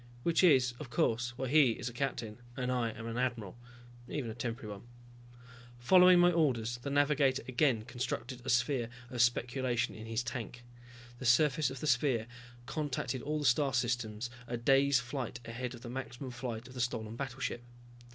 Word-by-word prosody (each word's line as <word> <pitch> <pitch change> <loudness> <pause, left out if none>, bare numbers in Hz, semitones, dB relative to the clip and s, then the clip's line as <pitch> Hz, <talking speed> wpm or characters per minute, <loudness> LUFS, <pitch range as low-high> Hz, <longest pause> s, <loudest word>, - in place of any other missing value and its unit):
Which 170 +2 +2
is, 130 -8 +5
of 150 - -7
course, 120 +1 0
why 130 - -2
he 140 -4 +5
is 115 - -6
a 120 - -5
captain 120 -4 -3 0.2
and 125 -1 -1
I'm 115 -3 -2
an 115 +1 -3
admiral, 115 -6 -2 0.5
even 125 -6 -3
a - - -6
temporary 115 -2 -5
one. 120 - -18 0.9
Following 180 +8 +7
my 175 0 +6
orders, 120 -8 +1
the 140 - -5
navigator 140 -1 +2
again 130 -3 +2
constructed 120 +1 -4
a 135 - -5
sphere 120 0 +1 0.2
of 120 -2 0
speculation 120 0 +1
in 110 +1 -9
his 115 +1 -1
tank. 120 0 -6 0.6
The 130 - -6
surface 140 +3 +4
of 135 -1 -8
the - - -3
sphere 125 -4 +2 0.4
contacted 135 -2 -3
all 150 +4 -2
the 150 - -2
star 135 +1 +3
systems 120 -1 -1 0.2
a 120 - -3
days 135 +3 +4
flight 125 -2 -5
ahead 125 +2 -5
of 120 - -13
the 125 - -8
maximum 130 0 -6
flight 120 -2 -5
of 130 - -12
the 125 - -3
stolen 110 -2 -2
battleship. 130 -1 -4
125 Hz, 175 wpm, -32 LUFS, 120-135 Hz, 0.9 s, Following